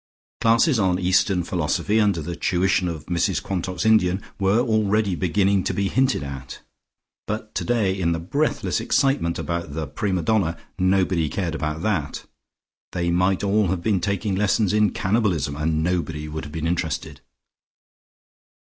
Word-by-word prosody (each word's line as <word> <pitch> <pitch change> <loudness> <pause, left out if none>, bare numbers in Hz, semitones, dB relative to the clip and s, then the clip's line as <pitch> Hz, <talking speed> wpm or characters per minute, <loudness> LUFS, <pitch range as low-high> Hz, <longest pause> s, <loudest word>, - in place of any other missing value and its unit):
Classes 115 +4 +4
on 95 -3 +2
Eastern 95 0 +2
philosophy 90 +5 0
under 100 -7 +2
the 85 +3 -5
tuition 90 +1 +1
of 80 -3 -5
Mrs 85 -2 0
Quantock's 95 +2 -3
Indian, 95 -4 +4 0.2
were 100 +3 +3
already 110 -4 +1
beginning 95 +2 +1
to - - -1
be 100 -1 0
hinted 130 - +1
at, 70 -2 -7 0.7
but 110 0 -4
today 110 -6 0
in 85 -2 +1
the 85 - 0
breathless 140 - -1
excitement 135 -12 +1
about 85 -4 -4
the 80 -1 -2
prima 95 +4 -2
donna 85 -4 +1 0.2
nobody 95 -3 +2
cared 85 -2 -2
about 75 0 -3
that; 90 -9 -2 0.7
they 85 -1 0
might 90 +3 +1
all 100 0 +2
have 85 -1 -2
been 100 -5 +1
taking 100 +1 -1
lessons 105 +1 +1
in 105 -1 +4
cannibalism, 95 -9 0
and 80 +1 0
nobody 80 -3 -2
would 80 +1 -5
have 75 - -9
been 80 0 -4
interested. 80 -3 -2
95 Hz, 150 wpm, -23 LUFS, 85-105 Hz, 0.7 s, Classes